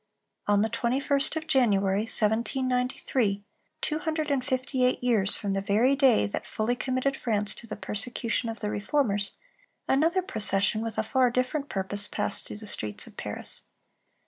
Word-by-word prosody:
On 205 0 +3
the - - +1
21st 275 +4 0
of 320 0 -3
January, 205 -9 +2
1793, 235 -1 0 0.4
two 305 0 -1
hundred 315 -2 -2
and 270 -3 0
fifty 255 0 -1
eight 250 0 +1
years 220 -6 +2
from 200 -2 -3
the 195 - -1
very 220 +7 +2
day 265 - +4
that 100 - -5
fully 220 +3 -1
committed 260 +2 -1
France 210 -5 0
to 230 - -10
the - - -5
persecution 230 +3 -2
of 225 - -7
the 210 -1 -2
Reformers, 205 -2 0 0.5
another 330 +7 +2
procession, 210 - +2
with 225 -1 -4
a - - +1
far 255 +3 +2
different 255 +4 -2
purpose, 200 +1 0
passed 210 - +3
through - - -7
the 215 - -9
streets 105 - -2
of - - -15
Paris. - - -2
235 Hz, 165 wpm, -27 LUFS, 205-265 Hz, 0.5 s, day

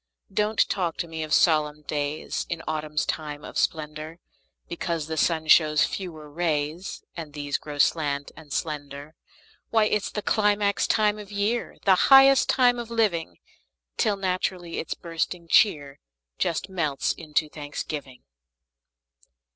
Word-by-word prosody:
Don't 210 +2 +2
talk 175 -4 -1
to 170 - -3
me 160 -1 -6
of 155 -1 -5
solemn 150 -3 +3
days 145 0 -3
In 165 -2 -4
autumn's 150 -1 -1
time 150 -2 -4
of - - -10
splendor, 155 +1 -2 0.5
Because 170 -2 -3
the 160 +1 -4
sun 160 0 +1
shows 155 -1 +5
fewer 160 -6 -6
rays, 155 +2 -2
And 160 -4 -7
these 145 -1 -2
grow 145 -1 -8
slant 145 -1 +1
and 155 -3 -14
slender. 145 -1 -4 0.6
Why, 225 -1 +3
it's 210 -1 0
the 210 - -5
climax 205 -1 +2
of 210 -2 +1
the 205 - -9
year, 215 +4 -1
The 195 - +6 0.2
highest 270 0 +7
time 245 -2 +4
of 235 -1 -6
living! 185 - 0 0.6
Till 205 -2 +1
naturally 185 -2 -2
its - - -4
bursting 170 +1 -4
cheer 145 -7 +3 0.4
Just 170 -1 -1
melts 165 -7 -1
into 155 -1 -1
thanksgiving. 145 -3 -7
160 Hz, 140 wpm, -25 LUFS, 150-195 Hz, 0.6 s, highest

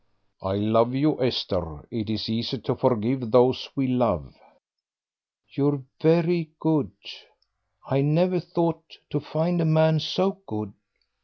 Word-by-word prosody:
"I 95 0 -2
love 115 +4 +2
you, 150 +2 +1
Esther; 85 -10 -2
it 110 -2 -4
is 110 -1 -2
easy 115 +4 -2
to 130 - -2
forgive 125 0 0
those 125 +2 +4
we 135 - 0
love." 115 - 0 1.2
"You're 145 -1 +1 0.2
very 165 0 +3
good; 155 -3 +1 1.0
I 135 +1 +1
never 175 +5 +2
thought 170 -1 -3
to 145 - 0
find 160 +4 -1
a - - +1
man 160 0 +4
so 185 +6 -1
good." 105 -1 -5
135 Hz, 130 wpm, -25 LUFS, 115-160 Hz, 1.2 s, those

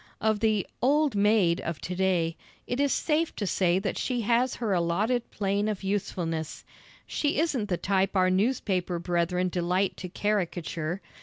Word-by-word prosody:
Of 220 -1 +1
the 215 -3 +2 0.2
"old 290 +2 +3
maid" 200 -4 +3
of 170 -3 -4
to 180 - -4
day, 175 -3 +1 0.3
it 245 - -3
is 285 -1 +2
safe 320 +1 0
to 205 - -2
say 180 -2 +2
that 195 +1 -2
she 245 -2 -1
has 240 +3 +2
her 225 -5 -1
allotted 200 +8 0
plane 200 +1 -1
of 210 -3 -3
usefulness. 175 -5 -3 0.4
She 295 -1 -1
isn't 275 -9 0
the 180 - +1
type 195 +1 0
our 185 -1 +4
newspaper 190 -4 0
brethren 175 +1 0
delight 180 +2 0
to 180 - -6
caricature. 175 -4 -2
195 Hz, 160 wpm, -27 LUFS, 175-220 Hz, 0.4 s, our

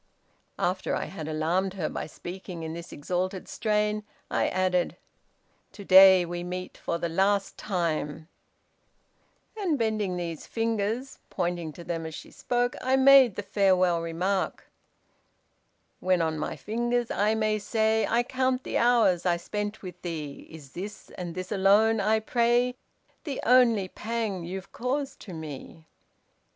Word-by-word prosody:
After 185 +2 -1
I - - -2
had 160 -5 -7
alarmed 170 +5 0
her 170 -5 -1
by - - -5
speaking 175 +1 -8
in 160 0 -4
this 170 0 -8
exalted 180 +5 -3
strain, 210 -1 0 0.3
I - - +2
added, 185 -1 0 0.8
'to 200 - -10
day 190 -1 +8
we 175 0 -5
meet 180 +1 -5
for 170 - -3
the 170 0 -2
last 195 +4 +1
time,' 160 -5 -2 1.3
and 375 -8 0
bending 215 -5 -1
these 170 -3 -5
fingers 225 +3 -2
(pointing 175 -2 -2
to 170 - -10
them 165 -1 -3
as 160 - -7
she - - -10
spoke) 245 0 -1
I 260 +1 +2
made 265 -5 +7
the 205 - -4
farewell 185 -3 +2
remark: 175 +2 -2 1.3
When 185 -1 +2
on 160 -1 0
my 155 - -3
fingers, 240 +2 -1
I 210 +2 +2
must 215 -2 -1
say 220 -1 +2
I 235 +1 +3
count 260 0 0
the - - -1
hours 230 -8 +4
I 175 -1 +3
spent 210 +4 -4
with 180 -1 -9
thee, 155 -5 -6
Is 150 -4 -12
this, 200 +6 -8
and 175 -2 -6
this 185 +2 -5
alone, 210 +3 +4
I 215 +2 +2
pray 240 +2 +2 0.5
The 285 -4 -4
only 235 -5 +5
pang 215 -4 -3
you've 190 +2 -7
caused 270 +3 -3
to 190 - -10
me? 160 +1 -9
190 Hz, 145 wpm, -27 LUFS, 175-220 Hz, 1.3 s, day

